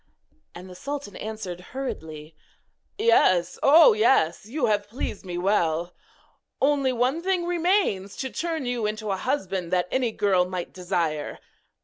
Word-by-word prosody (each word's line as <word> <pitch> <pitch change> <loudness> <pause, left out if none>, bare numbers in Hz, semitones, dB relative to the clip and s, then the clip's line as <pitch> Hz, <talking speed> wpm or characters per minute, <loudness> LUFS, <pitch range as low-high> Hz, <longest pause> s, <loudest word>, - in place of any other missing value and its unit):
And 180 +2 -9
the 185 - -11
sultan 275 +1 -6
answered 210 -5 -6
hurriedly: 160 - -7 0.6
'Yes! 185 - +3
oh, 330 - +7
yes! 210 - +2
you 260 +3 -1
have 205 -2 0
pleased 225 -3 -5
me 180 -2 -5
well! 175 -3 0 0.7
Only 275 -1 +2
one 255 +6 0
thing 365 -1 0
remains 345 - 0
to 265 -1 -4
turn 325 -4 -3
you 245 -3 -1
into 215 -1 -3
a - - +1
husband 190 -7 -2
that 180 -1 +1
any 255 -3 +1
girl 195 -4 +2
might 180 -1 -5
desire. 170 -4 -2
210 Hz, 140 wpm, -25 LUFS, 180-275 Hz, 0.7 s, oh